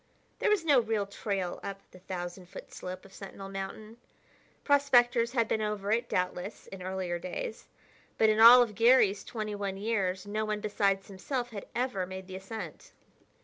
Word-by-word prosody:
There - - +2
was 410 -6 +2
no 285 -5 +6
real 220 -3 0
trail 195 -2 -3
up 195 0 -6
the 185 - -14
thousand 180 0 -6
foot 190 - -11
slope 185 +1 -7
of 195 - -16
Sentinel 195 0 -9
Mountain. 195 +3 -7 0.7
Prospectors 245 -4 +4
had 230 -3 +2
been 220 - 0
over 210 -1 -2
it, 230 +2 +1
doubtless, 180 +2 -2
in 195 -1 -10
earlier 185 -2 -3
days, 440 - -6 0.5
but 220 - +5
in 215 0 +3
all 240 +2 +10
of 225 -3 -5
Garry's 225 -3 +4
twenty 215 -2 -5
one 200 -1 -3
years 195 -3 -1
no 215 +1 -2
one 215 -1 -2
besides 200 -2 0
himself 240 +6 -4
had 200 -3 -7
ever 235 -7 -1
made 190 0 -7
the 185 0 -9
ascent. 190 -3 -8
205 Hz, 175 wpm, -30 LUFS, 190-230 Hz, 0.7 s, all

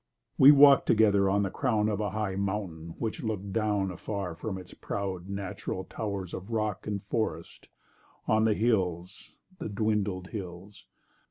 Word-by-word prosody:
We 135 - +10
walk'd 140 -1 +7
together 100 -3 +4
on 100 +1 +2
the 95 - -2
crown 110 -6 +1
Of 105 -2 -1
a 105 -1 -1
high 100 -1 -2
mountain 95 -5 -3
which 110 -2 -3
look'd 100 -3 -4
down 105 -4 0
Afar 90 0 -4
from 95 +4 -5
its 90 -1 -11
proud 95 -2 -4
natural 100 -1 -4
towers 100 -5 -5
Of 95 +4 -7
rock 110 -4 -2
and 100 -2 -3
forest, 110 +2 -4 0.6
on 110 0 +3
the 110 -2 +3
hills— 95 -5 -1 0.2
The - - -4
dwindled 100 -3 -1
hills! 95 -1 -8
100 Hz, 155 wpm, -29 LUFS, 95-110 Hz, 0.6 s, We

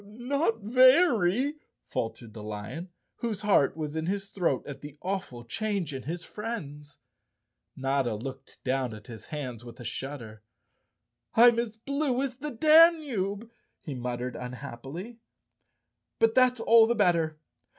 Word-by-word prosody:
"Not 230 +3 -1
very," 255 - +4 0.3
faltered 115 -1 -4
the 110 - -8
lion, 105 - -6 0.3
whose 225 -4 -3
heart 160 -8 +3
was 155 -1 -4
in 160 +1 -2
his 195 +1 -2
throat 170 -9 0
at 140 - -8
the 145 0 -10
awful 180 -11 -4
change 195 - -2
in 135 - -5
his 170 +5 -5
friends. 150 -11 -7 0.8
Notta 135 -3 0
looked 130 +4 -9
down 130 -3 -1
at 105 - -13
his 110 -3 -10
hands 130 -6 -5
with 120 +1 -11
a 120 - -9
shudder. 115 -7 -6 0.9
"I'm 235 0 +7
as 225 -2 -3
blue 275 +1 -1
as 255 -2 -4
the 300 +3 -4
Danube," 275 - +4 0.3
he 150 - -6
muttered 125 0 -4
unhappily. 135 - -7 1.0
"But 225 0 +3
that's 255 -1 +4
all 225 0 +6
the 235 - +1
better. 170 -6 +2
175 Hz, 140 wpm, -28 LUFS, -, 1.0 s, I'm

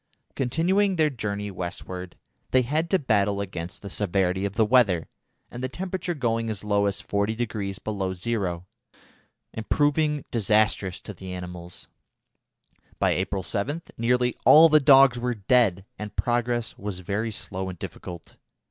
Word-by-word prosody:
Continuing 185 +9 +1
their 155 -3 +2
journey 105 -4 -4
westward, 90 0 -6 0.3
they 130 0 +3
had 155 +7 -1
to 190 - +4
battle 105 - +1
against 90 -1 -6
the 100 - -6
severity 95 -1 0
of 100 - -3
the 110 +1 +3
weather, 105 -8 +3 0.4
the 125 +2 -4
temperature 180 +2 -4
going 115 -4 -1
as 105 -2 -4
low 100 -1 +2
as 100 - -2
40° 105 -1 -2
below 95 -3 -2
zero, 90 -4 -2 0.9
and 110 -1 -7
proving 150 0 +1
disastrous 105 -4 +1
to 105 - -8
the 95 0 -9
animals. 90 -1 -8 1.1
By - - +2
April 95 +1 -1
7 140 - -2
nearly 125 +1 +1
all 160 +2 +8
the 155 0 +6
dogs 135 -3 +6
were 125 0 -1
dead, 100 -3 +2
and 105 0 -7
progress 120 -1 -1
was 100 -2 -5
very 105 +5 -2
slow 95 -3 -3
and 90 - -8
difficult. 85 +1 -9
110 Hz, 145 wpm, -25 LUFS, 95-125 Hz, 1.1 s, all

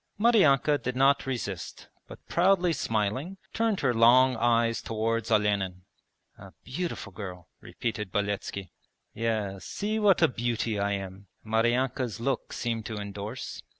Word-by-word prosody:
Maryanka 155 - +4
did 125 0 -3
not 135 +1 +3
resist 100 - -5 0.2
but - - -13
proudly 180 -1 +3
smiling 130 - -2 0.2
turned 225 -3 0
her 130 -3 +2
long 125 +3 +6
eyes 115 0 +2
towards 115 +1 -1
Olenin. 100 -4 +1 0.6
'A - - -12
beautiful 140 - -4
girl,' 90 -3 -8
repeated 105 -4 -4
Beletski. 100 -2 -3 0.4
'Yes, 105 -4 -2
see 215 +2 -2
what 205 -4 +4
a - - +7
beauty 115 -3 -2
I 100 0 0
am,' 95 0 -6 0.2
Maryanka's 120 +2 0
look 125 +2 -2
seemed 115 -2 -3
to 110 - -5
endorse. 105 +4 -6
115 Hz, 130 wpm, -28 LUFS, 105-135 Hz, 0.6 s, a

